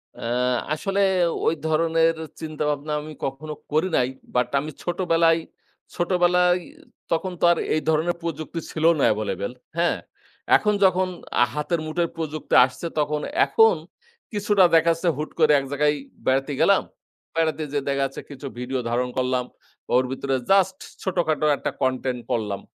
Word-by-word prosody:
অ্যা - - -6 0.5
আসলে 195 +6 -1 0.5
ওই - - +4
ধরনের 165 +1 +2 0.3
চিন্তা 155 -1 -4
ভাবনা 150 +1 -2
আমি 155 +1 -9
কখনো 135 +3 -5 0.2
করি 155 +4 +2
নাই। 125 - +2 0.3
বাট 125 0 +2
আমি 150 +3 -5
ছোটবেলায় 170 -2 +2 0.6
ছোটবেলায় 180 0 +3 0.5
তখন 170 +3 0
তো - - -6
আর 170 - +2 0.2
এই 155 - 0
ধরনের 160 +2 +1
প্রযুক্তি 165 0 -4
ছিল 155 - -4 0.2
না - - +2
এভেইলেবেল 105 -1 -2 0.3
হ্যাঁ? 170 +1 +2 0.6
এখন 210 0 +1
যখন 185 0 +3 0.3
আ - - +8
হাতের 150 +3 -1
মুঠোয় 165 +2 -1
প্রযুক্তি 155 -1 -4
আসছে, 130 +6 -6
তখন 150 0 0 0.2
এখন 450 0 +5 0.6
কিছুটা 205 -2 +3
দেখা 165 +1 +5
যাচ্ছে 165 +2 0
হুট 155 +1 -3
করে 155 -2 +5
এক 135 - -5
জায়গায় 150 +1 +2 0.3
বেড়াতে 135 +2 +1
গেলাম। 200 -1 +5 0.5
বেড়াতে 160 -1 0
যেয়ে 145 -1 -2
দেখা 140 0 0
যাচ্ছে 135 - -6
কিছু 140 0 -8
ভিডিও 130 +1 -2
ধারণ 125 +1 0
করলাম। 125 -1 0 0.5
ওর 125 - +5
ভিতরে 135 0 -1 0.2
জাস্ট 190 -1 +4 0.3
ছোটখাটো 170 -5 0
একটা - - -3
content 130 -1 0
করলাম। 105 -4 -1
155 Hz, 150 wpm, -24 LUFS, 135-175 Hz, 0.6 s, আ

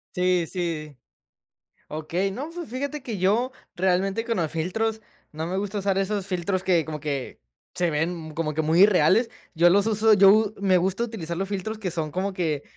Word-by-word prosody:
Sí, 180 -1 +2
sí. 160 -6 -4 0.9
Okey. 165 +5 -2
No, 270 +11 -5
fi 345 -1 -6
fíjate 280 +4 -4
que 230 -6 -5
yo 220 +8 +1 0.2
realmente 190 +4 +1
con 230 -1 -1
los 165 -4 -1
filtros 220 +7 -2 0.3
no 155 +1 -4
me 180 +2 -3
gusta 205 +1 -2
usar 195 -1 0
esos 195 0 -1
filtros 185 0 -1
que 175 -3 +2
como 155 -1 -6
que 140 - -4 0.3
se 180 -2 +1
ven 160 0 -2
como 160 -1 -2
que 160 - 0
muy 160 +3 +2
irreales. 200 +3 +4 0.2
Yo 175 +1 +5
los 200 +3 +4
uso 220 0 +3
yo 205 +1 +6
me 190 -2 +3
gusta 190 +5 0
utilizar 170 -8 -5
los 195 +1 -2
filtros 205 +2 -4
que 195 -4 -3
son 160 -3 -3
como 190 +4 -2
que 160 -6 -1
185 Hz, 190 wpm, -25 LUFS, 165-210 Hz, 0.9 s, yo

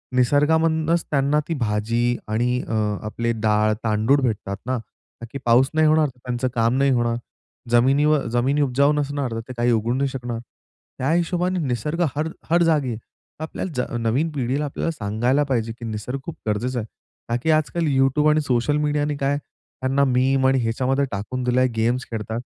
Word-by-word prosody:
निसर्गामधूनच 160 +5 +2
त्यांना 140 +1 +2
ती 165 - -1
भाजी 115 +2 0
आणि 120 +3 0
अ, - - -2 0.3
आपले 115 +2 -2
डाळ, 105 0 +3
तांदूळ 110 +5 +2
भेटतात 105 -5 -2
ना? 130 0 -1 0.4
का, - - -5
की - - -5
पाऊस 120 +3 +4
नाही 155 0 +4
होणार 155 0 +4
तर 125 -2 -13
त्यांचं 125 +1 -1
काम 115 +1 +2
नाही 140 0 +3
होणार. 120 -2 +1 0.6
जमिनीव 135 +6 +4 0.2
जमिनी 135 +5 +2
उपजाऊ 140 +2 +3
नसणार 145 -3 -2
तर 115 - -3
ते 130 - -7
काही 120 +1 +2
उगवू 115 +1 +1
नाही 135 +2 +1
शकणार. 120 -3 -5 0.6
त्या 135 +4 0
हिशोबाने 175 +2 0
निसर्ग 150 +8 -2
हर 155 +2 -1 0.2
हर 170 +1 +4
जागी 155 -6 +2
आहे. 115 - -3 0.5
आपल्याला 165 +3 -5
ज 125 - +1 0.2
नवीन 125 +8 +1
पिढीला 140 +1 -1
आपल्याला 145 +3 -2
सांगायला 120 +3 0
पाहिजे, 115 -3 0
की 120 - -6
निसर्ग 115 +4 -4
खूप 170 - -6
गरजेचा 120 +4 -1
आहे 110 - -5 0.4
का, 120 - +1
की 160 - +3
आजकाल 155 +2 +1
YouTube 135 +3 +3
आणि 155 0 +3
सोशल 135 +1 +1
मीडियाने 150 0 0
काय 140 +1 0
त्यांना 135 -1 -3
मीम 130 +1 +2
आणि 135 0 +3
ह्याच्यामध्ये 130 +4 0
टाकून 105 +5 -4
दिला 125 +1 +2
आहे, 130 - +3
गेम्स 120 +3 0
खेळतात. 110 0 -3
130 Hz, 180 wpm, -22 LUFS, 120-150 Hz, 0.6 s, पाऊस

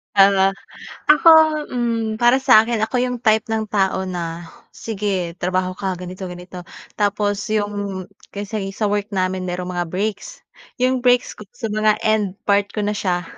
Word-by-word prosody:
Para, 195 -1 +5 0.6
ako, 300 +2 +6 0.4
hmm, 230 -3 -1
para 240 +1 +5
sa 255 -6 +7
akin 230 -2 0
ako 235 +3 0
'yong 250 0 -1
type 220 +2 +3
ng 220 0 -1
tao 190 -2 +1
na, 175 -2 -5 0.3
"Sige 195 -5 -3
trabaho 185 +1 -1
ka 190 0 -3
ganito 185 +1 -7
ganito," 180 0 -10 0.3
tapos 205 0 0
'yong 205 -3 -2 0.3
kaysa 205 +1 -4 0.2
sa 210 -2 0
work 205 0 -1
namin 185 0 -1
merong 180 0 -4
mga 175 -1 -2
breaks. 215 - -4 0.4
'Yong 255 0 +2
breaks 245 0 +2
ko 210 - -12
sa 225 -4 -4
mga 215 0 +2
end 210 -3 +1
part 200 0 +2
ko 210 - -1
na 205 - 0
siya 180 -4 -1
205 Hz, 160 wpm, -20 LUFS, 185-220 Hz, 0.6 s, sa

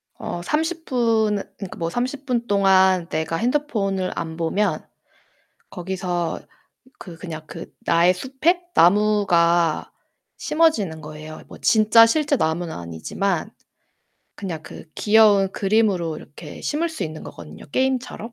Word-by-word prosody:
어 175 - -5
30 320 - -1
분 225 -4 +1 0.2
그러니까 195 -3 -8
뭐 165 0 -2
30 260 +7 -3
분 240 -2 -1
동안 190 -3 +4
내가 160 +1 -2
핸드폰을 215 - -1
안 160 -1 -4
보면 180 +5 0 0.9
거기서 180 -2 -3 0.6
그 170 -3 -10
그냥 160 -3 -7
그 165 - -10
나의 170 +2 +3
숲에 275 - 0
나무가 175 -4 +3 0.5
심어지는 225 - +1
거예요. 155 +1 -9
뭐 - - -12
진짜 220 +1 +6
실제 295 +3 +1
나무는 160 -1 -1
아니지만 155 - -3 0.8
그냥 170 -6 -6
그 - - -11
귀여운 205 -3 +4
그림으로 195 -6 +1
이렇게 145 - -11
심을 325 +3 -1
수 320 - -6
있는 155 -1 -5
거거든요, 80 -2 -11
게임처럼. 255 -3 -1
195 Hz, 255 characters per minute, -22 LUFS, 170-235 Hz, 0.9 s, 진짜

